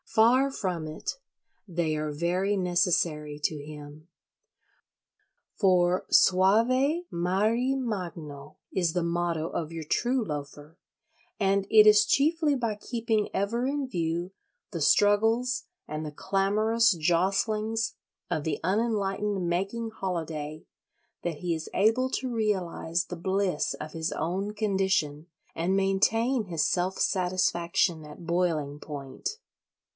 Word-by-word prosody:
Far 250 +5 +4
from 180 - -3
it: 155 - -5 0.5
they 165 -3 0
are 150 0 -2
very 180 +6 0
necessary 175 -5 0
to 150 -3 -1
him. 150 +1 -11 1.5
For 180 -2 +3
"Suave 245 - +4
mari 215 +9 +1
magno" 170 - -5 0.2
is 175 -3 +1
the 175 +1 -1
motto 170 -1 -1
of 160 -1 -4
your 165 -1 -6
true 245 - 0
Loafer; 150 +1 -7 0.6
and 195 -1 +2
it 215 -1 +7
is 210 0 +7
chiefly 300 +4 +2
by 230 -5 -1
keeping 225 -1 -1
ever 230 +5 0
in 280 -1 -1
view 170 -3 -2 0.4
the 170 -5 -4
struggles 225 - +3 0.2
and 155 +1 -4
the 150 - -5
clamorous 215 +7 +2
jostlings 200 +7 0 0.4
of 155 - -1
the 155 -2 -2
unenlightened 200 -1 0
making 195 +6 -2
holiday 160 -6 -4 0.6
that 170 -2 -2
he 175 +1 -2
is 160 0 -6
able 225 +6 +2
to 260 - -2
realise 185 -5 -1
the 180 - -6
bliss 190 -1 -1
of 155 0 -8
his 160 0 -2
own 190 +6 -2
condition 190 -7 0 0.3
and 180 +4 0
maintain 220 +5 +2
his 165 -4 0
self 185 +1 0
satisfaction 175 -3 +1
at 150 +3 -11
boiling 165 -5 0
point. 145 - -6
185 Hz, 120 wpm, -28 LUFS, 165-215 Hz, 1.5 s, it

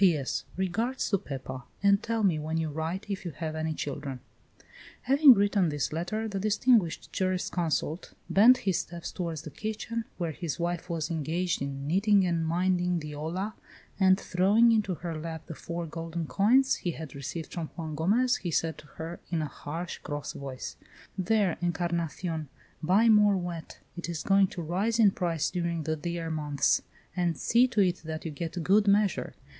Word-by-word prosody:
"P.S. 160 -8 +2
Regards 225 +8 -1
to 200 - +3
Pepa, 130 -3 -7 0.2
and 200 0 +5
tell 230 -1 -1
me 175 -6 +3
when 155 +2 -2
you 160 -1 -1
write 160 +6 -3
if 200 -2 -4
you 175 - -3
have 155 +1 -4
any 160 0 -1
children." 140 -3 -4 0.8
Having 275 0 +7
written 200 -3 +2
this 145 0 -2
letter, 185 +7 -2
the 200 -2 -3
distinguished 215 -2 +2
jurisconsult 175 -4 -1
bent 235 +6 +7
his 190 -4 +2
steps 170 0 -6
toward 170 -3 -3
the 155 +1 -7
kitchen, 220 +3 -4
where 170 -3 -2
his 160 -1 -4
wife 175 +1 -2
was 165 -2 -2
engaged 165 +2 -1
in 140 0 -4
knitting 195 +5 +3
and 165 -2 0
minding 180 +1 +1
the 155 -2 -5
olla, 175 +8 -3 0.5
and 190 0 +5
throwing 205 +7 +4
into 210 -5 +1
her 170 0 -5
lap 160 0 -6
the 165 - -7
four 170 +2 -5
golden 165 +1 -4
coins 250 - +3
he 180 - -3
had 155 -4 -8
received 140 +4 -6
from 165 -3 -3
Juan 160 -2 -4
Gomez, 210 - +2
he 175 - -4
said 165 0 0
to 150 - -14
her, 165 +2 -6
in 165 -3 0
a - - -2
harsh, 165 +5 -6
cross 145 -1 -5
voice: 135 -2 -7 0.4
"There, 195 -1 +1
Encarnacion, 170 -2 -2 0.3
buy 195 +8 +4
more 210 -2 +6
wheat; 175 -3 -5 0.2
it 175 -1 -5
is 170 -2 -3
going 195 0 +4
to 175 - -6
rise 195 +8 0
in 215 -4 +6
price 165 -4 -1
during 170 -2 -1
the 155 +1 -1
dear 165 +1 -4
months; 150 -3 +1 0.3
and 175 -2 0
see 240 +2 +4
to 220 -4 +1
it 180 -2 +2
that 160 0 -6
you 160 - -3
get 165 +3 -4
good 205 +4 +4
measure. 200 0 +2
175 Hz, 180 wpm, -29 LUFS, 160-200 Hz, 0.8 s, Having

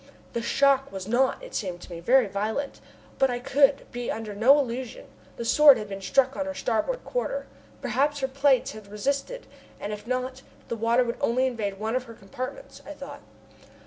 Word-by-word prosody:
The 235 - -1
shock 275 +2 +2
was 190 -1 -6
not, 260 - +1
it - - -10
seemed 185 -5 -3
to - - -12
me, 170 - -6
very 250 +8 +4
violent, 215 +8 -3 0.4
but 270 -1 +4
I 245 - -1
could 275 +3 +3
be 245 0 -4
under 220 -2 -4
no 240 +8 +6
illusion: 255 -2 -3 0.3
the 235 - -4
Sword 290 +3 +7
had 210 -1 -5
been 195 -1 -6
struck 265 +6 +2
on 285 - -2
her 285 - -4
starboard 265 - -1
quarter. - - -2 0.4
Perhaps 285 +4 +1
her 265 - +1
plates 270 -1 +2
had 215 -1 -11
resisted, 280 - -2 0.3
and 210 - -4
if 210 +2 -8
not, 255 +1 -2 0.3
the 235 - -1
water 230 +3 +3
would 235 -1 -3
only 255 +3 +2
invade 215 -6 -2
one 220 +3 -2
of 255 0 -1
her 230 -2 -11
compartments, 255 - -8
I - - -8
thought. - - -9
250 Hz, 195 wpm, -26 LUFS, 220-275 Hz, 0.4 s, Sword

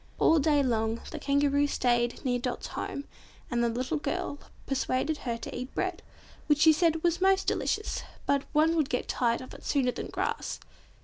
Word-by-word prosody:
All 325 - +5
day 290 -1 +3
long 225 -2 0
the 315 - -5
Kangaroo 285 0 +2
stayed 240 -3 0
near 245 -1 +1
Dot's 245 0 -3
home, 280 - -4 0.5
and 235 0 +1
the 235 - +2
little 255 +7 -2
girl 285 0 -3 0.3
persuaded 275 +2 0
her 235 -2 -3
to - - -7
eat 255 +2 -6
bread, 370 -2 -1 0.5
which 295 -2 +4
she 315 -1 +8
said 325 0 +2
was 345 0 +1
"most 385 0 +4
delicious, 425 - -1 0.2
but 280 0 +1
one 315 +2 +3
would 310 -4 +1
get 250 - -1
tired 235 -1 +1
of 255 - -10
it - - -12
sooner 265 -4 +1
than - - -5
grass." - - -3
280 Hz, 185 wpm, -29 LUFS, 250-315 Hz, 0.5 s, she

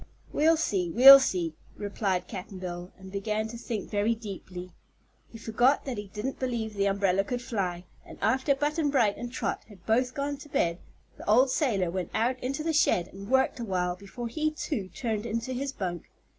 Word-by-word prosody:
"We'll 320 +2 +4
see; 195 - 0
we'll 270 +8 +11
see," 180 -10 -1 0.2
replied 195 -3 -2
Cap'n 190 +1 -7
Bill, 180 -1 -6
and 190 0 -11
began 210 +2 -2
to 235 - -7
think 230 -2 -4
very 210 +2 +1
deeply. 185 -4 -8 0.6
He 225 - -9
forgot 240 +5 +2
that 255 -6 -3
he 205 - -7
didn't 210 +7 -5
believe 235 -4 -2
the 200 -1 +1
umbrella 195 -1 +2
could 245 +4 -3
fly, 195 -8 -3 0.2
and - - -12
after 265 +2 +2
Button 295 +2 0
Bright 230 -8 +3
and 240 0 -6
Trot 255 - -2
had 195 -4 -16
both 250 +3 +1
gone 285 0 -2
to 295 +1 -12
bed 170 -8 0 0.4
the - - -7
old 250 +5 +5
sailor 200 - +1
went 185 0 -3
out 250 +3 +1
into 270 +4 -3
the 325 0 0
shed 180 - +3
and 195 +2 -10
worked 265 0 +2
awhile 180 -5 -1
before 200 +6 -7
he, 310 +6 0
too, 295 - -4
turned 220 +1 -3
into 230 +3 -3
his 270 +2 -2
"bunk." 180 - -5
220 Hz, 190 wpm, -28 LUFS, 190-260 Hz, 0.6 s, we'll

